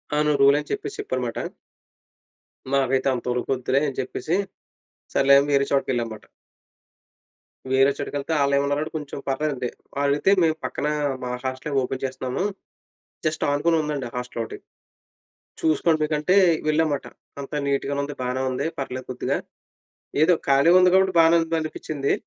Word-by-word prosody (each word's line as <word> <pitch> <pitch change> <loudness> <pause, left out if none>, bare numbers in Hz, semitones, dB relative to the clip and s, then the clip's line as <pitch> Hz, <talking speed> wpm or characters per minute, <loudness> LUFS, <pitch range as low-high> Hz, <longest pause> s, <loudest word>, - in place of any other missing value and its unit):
అవును. 150 0 +2
రూల్ 140 +1 +7
అని 150 - -8
చెప్పేసి, 415 -1 -3
చెప్పారు 415 0 -2
మాట. - - -4 1.3
మాకైతే 135 -1 +2
అంతోరుకొద్దులే, 125 +2 -1
అని 135 - -10
చెప్పేసి, 155 +6 -2 0.8
సర్లే 140 0 +6
అని 145 +1 -2
వేరే 140 0 +3
చోటికి 140 -1 +1
వెళ్ళాంమాట. 115 -3 -3 1.5
వేరే 135 +1 +5
చోటకి 145 0 -4
ఎళ్తే, 140 +4 -3
ఆళ్ళు 140 0 +2
ఏమన్నారంటే, 145 +2 0
కొంచెం 145 -2 -7
పర్లేదండి. 135 -3 -1 0.3
ఆలైతే 145 +6 +2
మేము 160 -1 +2
పక్కన 150 - -2 0.4
మా 125 - -3
హాస్టల్ 130 +2 -3
ఓపెన్ 130 +1 -4
చేస్తున్నాము, 130 +3 -3 0.8
జస్ట్ 155 0 0
ఆనుకునుందండి 150 -2 0
హాస్టల్ 125 -1 -4
ఒకటి. 110 - -8 1.0
చూసుకోండి 160 +1 +2
మీకంటే, 150 +4 +1 0.3
వెళ్ళాంమాట. 155 -2 +1 0.3
అంతా 140 +2 -5
నీట్‌గానే 140 0 0
ఉంది. 145 +1 -6
బానే 125 +1 -1
ఉంది. 130 - -2
పర్లేదు 130 -1 -5
కొద్దిగా, 130 - -1 0.9
ఏదో 180 +3 +5 0.2
ఖాళీగా 140 +6 +6
ఉంది 180 0 +5
కాబట్టి, 190 0 +3
బానే 165 +1 +5
ఉంది 165 0 -1
అనిపించింది. 155 -2 -3
140 Hz, 135 wpm, -24 LUFS, 130-155 Hz, 1.5 s, రూల్